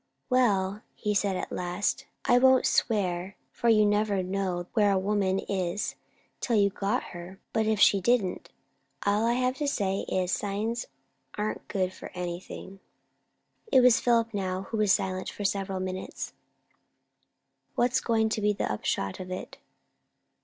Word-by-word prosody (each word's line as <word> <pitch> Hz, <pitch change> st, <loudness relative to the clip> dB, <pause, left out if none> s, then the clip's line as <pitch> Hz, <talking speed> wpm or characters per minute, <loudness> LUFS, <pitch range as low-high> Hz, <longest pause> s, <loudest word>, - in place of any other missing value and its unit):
"Well," 205 Hz, -5 st, +2 dB, 0.3 s
said 200 Hz, -1 st, +1 dB
he -, -, -2 dB
at -, -, -5 dB
last, 180 Hz, +9 st, -2 dB, 0.2 s
"I 245 Hz, -, +5 dB
won't 260 Hz, 0 st, +5 dB
swear; 190 Hz, -4 st, 0 dB, 0.2 s
for 235 Hz, -, 0 dB
you 215 Hz, -2 st, +6 dB
never 205 Hz, -2 st, +1 dB
know 185 Hz, -1 st, -2 dB
where 210 Hz, -3 st, +4 dB
a 195 Hz, -, +3 dB
woman 195 Hz, -1 st, +1 dB
is 190 Hz, 0 st, -2 dB, 0.5 s
till 235 Hz, -, 0 dB
you've 200 Hz, -2 st, +3 dB
got 205 Hz, +6 st, -1 dB
her; 175 Hz, +2 st, -9 dB
but 220 Hz, -1 st, +1 dB
if 220 Hz, -2 st, +1 dB
she 200 Hz, -1 st, +5 dB
didn't, 215 Hz, -4 st, +1 dB, 0.6 s
all 205 Hz, +3 st, +2 dB
I 235 Hz, -, +3 dB
have 255 Hz, +1 st, 0 dB
to 295 Hz, -, -1 dB
say 195 Hz, -7 st, 0 dB
is, 185 Hz, -1 st, 0 dB
signs 215 Hz, +5 st, -2 dB, 0.5 s
aren't 210 Hz, +1 st, -3 dB
good 185 Hz, -2 st, -1 dB
for -, -, -9 dB
anything." 180 Hz, +2 st, -6 dB, 0.9 s
It 260 Hz, -, +7 dB
was 245 Hz, -2 st, +6 dB
Philip 230 Hz, -2 st, +2 dB
now 190 Hz, -2 st, -2 dB
who 225 Hz, -, -5 dB
was 210 Hz, -2 st, +3 dB
silent, 185 Hz, -1 st, 0 dB
for 205 Hz, -, -7 dB
several 195 Hz, -1 st, -1 dB
minutes. 185 Hz, 0 st, -5 dB, 1.4 s
"What's 245 Hz, +2 st, +2 dB
going 220 Hz, -2 st, +2 dB
to 220 Hz, -, -1 dB
be 210 Hz, 0 st, +3 dB
the 195 Hz, -, -2 dB
upshot 95 Hz, -2 st, -2 dB
of 185 Hz, -, -7 dB
it?" 185 Hz, -, -6 dB
200 Hz, 155 wpm, -28 LUFS, 185-225 Hz, 1.4 s, It